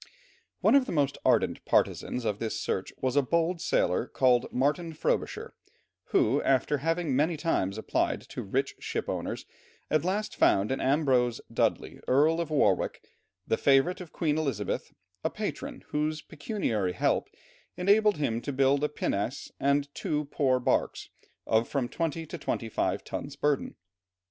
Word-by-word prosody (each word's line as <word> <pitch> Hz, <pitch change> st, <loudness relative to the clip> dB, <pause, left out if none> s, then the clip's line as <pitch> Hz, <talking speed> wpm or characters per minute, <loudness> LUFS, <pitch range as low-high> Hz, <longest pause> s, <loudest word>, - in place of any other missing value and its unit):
One -, -, +4 dB
of 275 Hz, -2 st, +5 dB
the -, -, -3 dB
most 140 Hz, -4 st, 0 dB
ardent -, -, +2 dB
partizans 125 Hz, -1 st, 0 dB
of 105 Hz, -2 st, -1 dB
this 110 Hz, -1 st, -2 dB
search -, -, -2 dB
was 130 Hz, 0 st, -1 dB
a 145 Hz, -, +5 dB
bold 170 Hz, +5 st, 0 dB
sailor, 90 Hz, +7 st, +1 dB
called 125 Hz, -2 st, +2 dB
Martin 150 Hz, +6 st, 0 dB
Frobisher, 155 Hz, -, -2 dB, 0.5 s
who 135 Hz, +7 st, +2 dB
after 135 Hz, +2 st, +2 dB
having 165 Hz, -1 st, 0 dB
many 155 Hz, +4 st, +2 dB
times 105 Hz, -, 0 dB
applied 110 Hz, -, 0 dB
to -, -, -5 dB
rich 135 Hz, +7 st, -1 dB
ship -, -, -3 dB
owners, -, -, -3 dB, 0.5 s
at 155 Hz, -1 st, +3 dB
last 200 Hz, +4 st, -1 dB
found 100 Hz, +5 st, +3 dB
in 135 Hz, -, -1 dB
Ambrose 130 Hz, -4 st, +2 dB
Dudley, -, -, 0 dB
Earl 155 Hz, +6 st, +4 dB
of 170 Hz, -, -4 dB
Warwick, 150 Hz, -2 st, +1 dB, 0.4 s
the 110 Hz, -, +1 dB
favourite 140 Hz, +7 st, +3 dB
of 175 Hz, -, -9 dB
Queen 155 Hz, -2 st, 0 dB
Elizabeth, 130 Hz, -10 st, -2 dB, 0.3 s
a -, -, +1 dB
patron, -, -, -5 dB
whose 155 Hz, +1 st, -1 dB
pecuniary 145 Hz, -, -2 dB
help -, -, +1 dB, 0.5 s
enabled 205 Hz, +3 st, +4 dB
him 120 Hz, -6 st, -1 dB
to -, -, -6 dB
equip 135 Hz, +1 st, +3 dB
a 150 Hz, -, +1 dB
pinnace 125 Hz, 0 st, -2 dB
and 140 Hz, +1 st, +1 dB
two 150 Hz, 0 st, -2 dB
poor 130 Hz, -3 st, +2 dB
barks 125 Hz, -, 0 dB, 0.4 s
of 110 Hz, +1 st, +2 dB
from 135 Hz, -4 st, -1 dB
twenty 165 Hz, +2 st, -2 dB
to 165 Hz, +2 st, -7 dB
twenty 115 Hz, -5 st, -2 dB
five -, -, -1 dB
tons' 140 Hz, 0 st, -6 dB
burden. 145 Hz, -1 st, 0 dB
145 Hz, 155 wpm, -28 LUFS, 125-160 Hz, 0.5 s, of